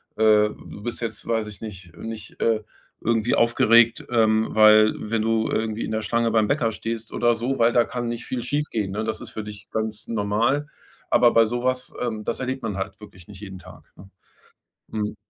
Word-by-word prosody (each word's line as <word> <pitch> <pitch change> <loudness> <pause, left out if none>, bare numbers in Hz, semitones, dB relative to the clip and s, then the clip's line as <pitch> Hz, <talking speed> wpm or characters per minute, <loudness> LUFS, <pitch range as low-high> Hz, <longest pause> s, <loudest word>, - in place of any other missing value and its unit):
äh, 105 -1 +4
du 105 - -12
bist 120 +1 -4
jetzt, 110 -2 -5
weiß 115 -2 0
ich 105 - -9
nicht 90 -6 -10
nicht, 115 +2 -8
äh, 110 -1 +1 0.4
irgendwie 115 0 +1
aufgeregt, 115 0 +4
ähm, 110 -2 +3
weil 110 0 +7
wenn 110 +1 -2
du 110 0 +1
irgendwie 110 0 -1
in - - -5
der 110 0 -1
Schlange 115 +1 0
beim 110 -1 +3
Bäcker 120 -4 +1
stehst 115 0 -5
oder 120 0 +2
so, 125 +4 -2
weil 115 0 +5
da 120 0 +4
kann 120 -1 -4
nicht 120 0 -4
viel 125 - -3
schiefgehen, 120 -8 -2
ne? 105 +3 -2
Das 110 0 -3
ist - - -7
für 110 - -6
dich 105 -1 -10
ganz 110 -1 -4
normal. 115 +7 0 0.4
Aber 120 - +5
bei 115 0 +5
so 120 +2 -3
was 130 0 -1
ähm, 110 -3 -3
das - - -3
erlebt 130 +1 -3
man 105 -3 -3
halt 95 +2 -5
wirklich 95 -5 -14
nicht 100 -3 -12
jeden 95 -3 -8
Tag, 90 0 -15
ne? 95 - -14 0.8
Mhm. 105 0 -3
110 Hz, 205 wpm, -24 LUFS, 105-115 Hz, 0.8 s, weil